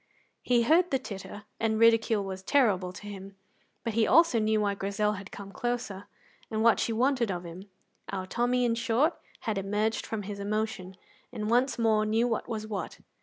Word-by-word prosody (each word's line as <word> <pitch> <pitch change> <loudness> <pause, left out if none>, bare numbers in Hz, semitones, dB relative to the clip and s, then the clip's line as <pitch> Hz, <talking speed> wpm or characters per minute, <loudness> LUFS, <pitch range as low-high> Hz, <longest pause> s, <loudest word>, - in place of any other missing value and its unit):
He 240 -1 +2
heard 335 +8 +4
the 270 - +2
titter, 205 -4 -8 0.2
and 220 -1 +1
ridicule 225 -2 +4
was 190 -1 -6
terrible 190 -6 +2
to 185 - -11
him; 195 -1 -9 0.5
but 230 - -2
he 225 0 +2
also 330 -8 +5
knew 215 0 +2
why 205 -1 +1
Grizel 200 +1 -1
had 200 0 -8
come 195 -1 -9
closer, 235 -4 -3 0.4
and 220 0 -1
what 230 -1 +5
she - - 0
wanted 245 0 +1
of 175 -2 -3
him. 180 +4 -10 0.4
Our 190 -1 -3
Tommy, 245 +4 +1
in 235 - +2
short, 235 +7 +1 0.2
had 215 -4 -1
emerged 210 +3 -1
from 220 -2 -3
his 200 0 -6
emotion, 205 -2 -3 0.3
and 215 +1 -3
once 250 +3 +2
more 220 -2 +3
knew 220 +3 +2
what 230 0 -2
was 220 -2 -3
what. 210 -2 -5
215 Hz, 185 wpm, -29 LUFS, 200-235 Hz, 0.5 s, also